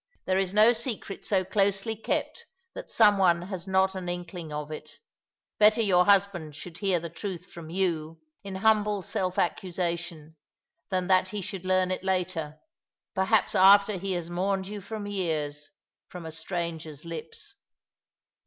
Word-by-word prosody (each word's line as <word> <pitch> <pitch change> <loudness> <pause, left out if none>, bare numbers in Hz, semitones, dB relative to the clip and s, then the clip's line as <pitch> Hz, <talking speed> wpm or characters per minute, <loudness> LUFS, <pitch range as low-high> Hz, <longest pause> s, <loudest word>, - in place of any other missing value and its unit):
There 185 0 +2
is 190 -2 0
no 215 +4 +6
secret 225 -4 -5
so 190 -3 +2
closely 200 +3 +1
kept 220 - -3 0.3
that - - -8
some 210 -3 +5
one 175 -2 +4
has 185 -1 -6
not 190 0 +2
an 185 -2 -5
inkling 175 -2 -6
of 150 0 -5
it. 155 - -7 0.7
Better 215 +2 +6
your 180 -3 +4
husband 190 -7 +2
should 170 +2 -9
hear 190 -3 +1
the 170 - -5
truth 180 0 -6
from 165 -2 -9
you, 165 -3 -1 0.2
in 195 -1 -6
humble 210 -2 +3
self 185 -3 -2
accusation, 170 -3 -2 0.5
than 185 -2 0
that 185 0 +4
he 205 +2 -4
should 190 -1 -6
learn 185 0 +2
it 185 - -3
later 180 -5 -2 0.3
— - - -66
perhaps 205 +2 +2
after 200 +2 +6
he 190 +1 -2
has 175 -2 -3
mourned 190 +2 -1
you 205 0 -6
for 210 +1 -6
years 155 -7 -2 0.2
— - - -65
from 180 -2 -8
a 160 - -6
stranger's 165 -3 -4
Ups." 165 - -8
185 Hz, 165 wpm, -27 LUFS, 170-200 Hz, 0.7 s, no